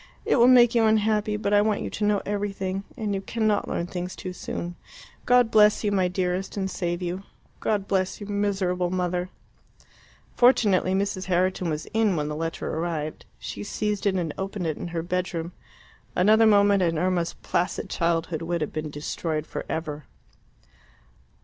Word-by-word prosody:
It - - +3
will 240 0 +6
make 245 -2 +7
you 230 -1 +3
unhappy, 215 -1 +2
but 205 -1 -1
I 205 - +6
want 215 0 +1
you - - -4
to 210 - -4
know 205 -1 +2
everything, 195 -2 -2
and 215 -4 -2
you 195 - -2
cannot 215 -1 0
learn 170 - -2
things 180 0 -5
too 185 - -6
soon. 175 0 -5 0.5
God 245 -2 +5
bless 210 0 +5
you, 205 - +1
my 190 -2 +2
dearest, 180 +2 -2
and 190 -1 -1
save 175 0 -2
you. 180 +2 -3 0.4
God 205 -2 -1
bless 190 -1 0
your 205 - -7
miserable 195 -3 0
mother." 180 0 -1 1.1
Fortunately 210 -7 +4
Mrs. 195 -1 -1
Herriton 185 -1 +1
was 155 0 -3
in 220 -4 +2
when 150 -1 -1
the 150 - -3
letter 165 +1 -3
arrived. 160 -2 -3
She 100 - -6
seized 210 - -2
it 195 - +2
and 170 -5 -1
opened 195 -1 -3
it 160 -2 -1
in - - -5
her 170 -1 -3
bedroom. 175 -1 -2 0.6
Another 220 +4 +5
moment, 200 -2 +5
and 165 -2 +1
Irma's 175 0 0
placid 175 - -1
childhood 165 -1 -1
would 170 0 -2
have 150 - -3
been 155 -1 -3
destroyed 155 +1 -3
for - - -6
ever. 155 -2 -4
185 Hz, 175 wpm, -25 LUFS, 170-205 Hz, 1.1 s, make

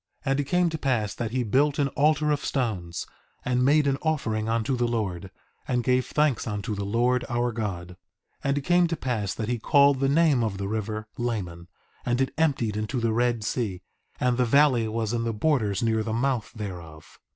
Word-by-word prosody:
2:7 135 - +1
And 135 - +1
it - - +1
came 180 +4 +2
to 160 - -3
pass 115 -8 0
that 115 -2 -3
he 125 +2 -1
built 140 +6 +2
an 140 -2 +1
altar 150 +1 +2
of 145 - -1
stones, 95 -10 -2 0.4
and 125 0 +1
made 145 +3 +4
an 135 -1 +1
offering 115 -9 -1
unto 115 +3 0
the 120 -1 0
Lord, 100 -6 -3 0.4
and 125 -2 0
gave 125 0 +2
thanks 150 -7 +1
unto 105 +1 -3
the 100 -1 -3
Lord 120 +5 +1
our 120 0 0
God. 100 -6 -4
2:8 90 - -12 0.5
And 140 +1 +1
it - - 0
came 175 +4 +3
to 165 -1 -3
pass 110 -7 -2
that 110 - -3
he 120 0 -1
called 140 +2 +4
the 135 0 +2
name 145 -4 +3
of 105 -3 -2
the 100 0 -3
river, 110 0 -3
Laman, 90 -8 -3 0.4
and 120 0 0
it 135 - 0
emptied 135 -9 +1
into 110 +4 -2
the 115 -1 0
Red 120 -1 +1
Sea; 105 -5 -2 0.4
and 125 -1 +1
the 125 - +3
valley 130 -2 +4
was 110 0 -2
in 115 -1 0
the 115 -1 -1
borders 110 -5 0
near 110 -1 +1
the 110 0 -3
mouth 120 -1 -1
thereof. 85 -7 -8
120 Hz, 210 wpm, -26 LUFS, 110-135 Hz, 0.5 s, made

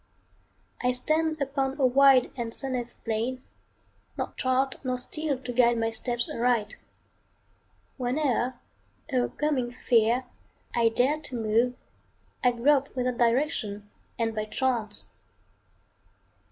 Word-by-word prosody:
I 250 0 +2
stand 315 +4 +1
upon 275 0 -1
a 265 - +4
wide 265 0 +5
and 235 -2 -3
sunless 250 -3 -1
plain, 235 +3 -3 0.7
Nor - - -3
chart 260 +1 0
nor 255 -1 -1
steel 290 +3 -2
to 250 -1 -6
guide 240 -1 +4
my 225 0 0
steps 240 +1 -2
aright. 230 -3 0 1.2
Whene'er, 255 -1 0 0.6
o'ercoming 255 0 0
fear, 235 0 +2 0.5
I 230 -1 +3
dare 260 +7 +1
to 295 -4 -8
move, 230 +2 +1 0.7
I 250 - +6
grope 275 +3 +2
without 250 -1 -1
direction 230 -5 0 0.3
and 225 -1 0
by 215 -1 -2
chance. 225 -2 -1
250 Hz, 115 wpm, -27 LUFS, 235-270 Hz, 1.2 s, I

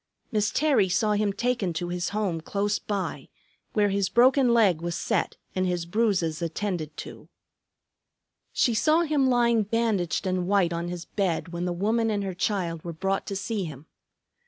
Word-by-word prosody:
Miss 215 -1 +1
Terry 280 -11 +2
saw 210 +4 +2
him 210 0 +1
taken 235 -4 -1
to 175 +2 -3
his 175 0 -2
home 200 -5 -1
close 205 +5 -1
by, 200 -3 -4 0.4
where 205 -1 +3
his 195 -1 0
broken 255 +1 +4
leg 200 -9 +4
was 170 0 -3
set - - -1 0.2
and 185 0 0
his 175 -2 -1
bruises 180 -5 0
attended 170 -2 -3
to. - - -9 1.2
She 240 - +2
saw 310 +9 +3
him 295 -5 +2
lying 235 -2 +3
bandaged 210 -6 0
and 185 -1 -1
white 190 -4 +2
on 170 +1 -3
his 175 -1 -5
bed 185 -3 -1
when 170 +1 -4
the 180 - -1
woman 220 +6 +1
and 205 -2 -1
her 190 -1 -3
child 175 -4 -2
were 170 - -5
brought 195 +4 -2
to 200 - -3
see 200 0 -2
him. 150 -2 -9
195 Hz, 175 wpm, -26 LUFS, 175-220 Hz, 1.2 s, broken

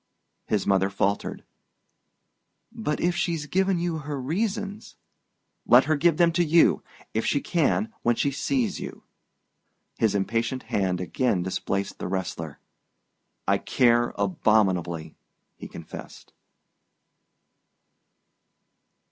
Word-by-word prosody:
His 105 -3 0
mother 95 -1 +3
faltered. 100 +1 -1 1.3
"But 220 -10 -3
if 175 0 +1
she's 170 -4 -1
given 190 +3 +1
you 170 -2 -1
her 145 -1 -5
reasons 205 - -3 0.3
?" - - -51 0.3
"Let - - +7
her 155 - +1
give 160 +1 +3
them 170 -1 +5
to 175 +1 +2
you! 165 +1 +4 0.3
If 110 - 0
she 145 - +1
can 185 +9 0
when 120 0 +2
she 140 - +1
sees 225 - -1
you...." - - -8 1.0
His 110 -3 +2
impatient 115 +5 -1
hand 95 -3 -1
again 95 0 0
displaced 95 +1 -3
the - - -3
wrestler. 85 -5 -4 0.9
"I - - +3
care 120 -1 +2
abominably," 95 - +1 0.4
he - - -9
confessed. - - -10
130 Hz, 115 wpm, -26 LUFS, -, 1.3 s, Let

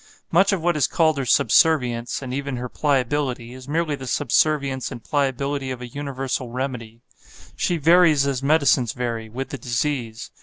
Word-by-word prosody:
Much 195 +4 +4
of 195 - 0
what 175 -1 +2
is 145 -4 +2
called 160 -2 +2
her 135 - -3
subservience, 120 0 +2
and 125 -1 -5
even 140 -1 -3
her 125 +1 -4
pliability, 130 -3 -1
is 130 0 -11
merely 160 +1 -1
the 135 -2 -6
subservience 140 0 +1
and 115 - -8
pliability 140 0 -1
of 130 -2 -5
a 125 - -7
universal 135 -2 -4
remedy; 120 -3 -5 0.5
she 175 - 0
varies 165 -2 +5
as 135 -2 -1
medicines 140 -5 +2
vary, 115 -3 -4
with 130 +4 -5
the 140 - -6
disease. 120 -3 -3
135 Hz, 165 wpm, -22 LUFS, 125-145 Hz, 0.5 s, varies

